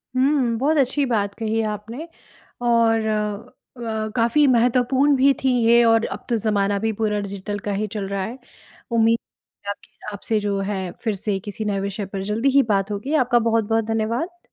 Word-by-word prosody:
हुँ। 255 Hz, -3 st, +2 dB
बहुत 305 Hz, +4 st, +2 dB
अच्छी 275 Hz, +1 st, +2 dB
बात 205 Hz, -5 st, 0 dB
कही 220 Hz, 0 st, -1 dB
है 225 Hz, -, 0 dB
आपने 225 Hz, +9 st, -7 dB, 0.5 s
और 230 Hz, -2 st, +3 dB, 0.7 s
अ, 220 Hz, -2 st, -3 dB
काफ़ी 240 Hz, +5 st, +3 dB
महत्वपूर्ण 255 Hz, +3 st, +3 dB
भी 275 Hz, +1 st, +4 dB
थीं 260 Hz, -1 st, +3 dB
ये 235 Hz, +1 st, +6 dB
और 225 Hz, 0 st, +4 dB
अब -, -, -6 dB
तो 235 Hz, -, +2 dB
ज़माना 205 Hz, -2 st, 0 dB
भी 225 Hz, +2 st, 0 dB
पूरा 210 Hz, -1 st, -1 dB
डिजिटल 200 Hz, +1 st, -5 dB
का -, -, 0 dB
ही 210 Hz, +2 st, -1 dB
चल 205 Hz, -3 st, -3 dB
रहा 195 Hz, -1 st, -2 dB
है। 235 Hz, +6 st, -6 dB, 0.5 s
उम्मीद 230 Hz, 0 st, +3 dB, 0.5 s
है -, -, -4 dB
आपके 205 Hz, +1 st, -10 dB
आपसे 215 Hz, +2 st, -1 dB
जो 205 Hz, -1 st, -1 dB
है 190 Hz, -3 st, -3 dB
फिर 220 Hz, -4 st, 0 dB
से 200 Hz, 0 st, -2 dB
किसी 205 Hz, +2 st, -6 dB
नए 200 Hz, -2 st, 0 dB
विषय 200 Hz, +1 st, -3 dB
पर 195 Hz, 0 st, -5 dB
जल्दी 220 Hz, +7 st, +1 dB
ही 275 Hz, +1 st, +5 dB
बात 195 Hz, +1 st, 0 dB
होगी। 215 Hz, +9 st, -3 dB
आपका 245 Hz, 0 st, +3 dB
बहुत-बहुत 225 Hz, -1 st, +1 dB
धन्यवाद। 230 Hz, +11 st, -2 dB
225 Hz, 185 wpm, -22 LUFS, 205-245 Hz, 0.7 s, ये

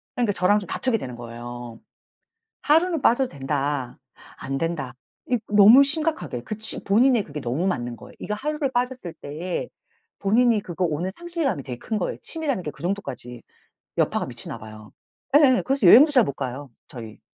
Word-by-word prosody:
그러니까 235 Hz, -4 st, +1 dB
저랑 195 Hz, +3 st, +3 dB
좀 195 Hz, -, -9 dB
다투게 250 Hz, +4 st, -1 dB
되는 125 Hz, -, -7 dB
거예요. 120 Hz, 0 st, -8 dB, 0.8 s
"하루는 325 Hz, +2 st, +3 dB
빠져도 255 Hz, +2 st, +3 dB
된다." 140 Hz, -2 st, -3 dB, 0.4 s
"안된다." 135 Hz, -1 st, -3 dB, 0.4 s
이 245 Hz, -, +3 dB
너무 210 Hz, +6 st, +8 dB
심각하게 300 Hz, -, -1 dB
그 215 Hz, -, -5 dB
취 220 Hz, +1 st, -4 dB
본인이 235 Hz, +3 st, +3 dB
그게 150 Hz, -5 st, -7 dB
너무 135 Hz, +8 st, -2 dB
맞는 120 Hz, -10 st, -2 dB
거예요. -, -, -14 dB
이거 210 Hz, -, -4 dB
하루를 295 Hz, +4 st, -2 dB
빠졌을 245 Hz, -7 st, -2 dB
때 165 Hz, +5 st, -5 dB, 0.5 s
본인이 225 Hz, +2 st, +3 dB
그거 180 Hz, -1 st, -3 dB
오는 170 Hz, +3 st, -1 dB
상실감이 335 Hz, -, -2 dB
되게 125 Hz, -2 st, -6 dB
큰 220 Hz, -, -3 dB
거예요. 185 Hz, -, -3 dB
취미라는 290 Hz, -, -2 dB
게 150 Hz, -, -3 dB
그 -, -, -14 dB
정도까지 135 Hz, -, -4 dB, 0.6 s
여파가 -, -, +1 dB
미치나 -, -, -7 dB
봐요. 110 Hz, 0 st, -12 dB, 0.4 s
예예. 265 Hz, -4 st, +5 dB
그래서 270 Hz, -6 st, +2 dB
여행도 275 Hz, -, +9 dB
잘 255 Hz, -4 st, +6 dB
못 140 Hz, -, -4 dB
가요, 135 Hz, 0 st, -6 dB, 0.2 s
저희. 115 Hz, -4 st, -10 dB
185 Hz, 365 characters per minute, -24 LUFS, -, 0.8 s, 여행도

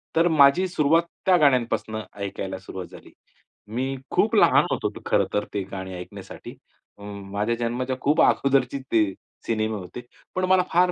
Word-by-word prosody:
तर 165 Hz, +2 st, +4 dB
माझी 155 Hz, +4 st, +5 dB
सुरुवात 165 Hz, -1 st, +2 dB, 0.2 s
त्या 185 Hz, -2 st, +5 dB
गाण्यांपासनं 120 Hz, -6 st, +1 dB, 0.2 s
ऐकायला 95 Hz, -1 st, -4 dB
सुरुवात 95 Hz, -2 st, -8 dB
झाली. -, -, -14 dB, 0.6 s
मी 130 Hz, +5 st, -2 dB, 0.2 s
खूप -, -, +2 dB
लहान -, -, +5 dB
होतो -, -, -1 dB, 0.2 s
खरं -, -, +2 dB
तर 105 Hz, -, 0 dB
ते 100 Hz, -, -1 dB
गाणी 95 Hz, -1 st, -6 dB
ऐकण्यासाठी. 90 Hz, 0 st, -10 dB, 0.4 s
म -, -, -12 dB, 0.3 s
माझ्या 105 Hz, +3 st, 0 dB
जन्माच्या 120 Hz, +2 st, -2 dB
खूप 150 Hz, +3 st, +3 dB
अगोदरचे 135 Hz, -1 st, +2 dB
ते 110 Hz, -2 st, +4 dB, 0.4 s
सिनेमे 110 Hz, -1 st, -1 dB
होते. 90 Hz, +5 st, -8 dB, 0.3 s
पण 185 Hz, 0 st, +1 dB
मला 185 Hz, -1 st, +5 dB
फार 180 Hz, +1 st, +4 dB
125 Hz, 155 wpm, -24 LUFS, 105-155 Hz, 0.6 s, माझी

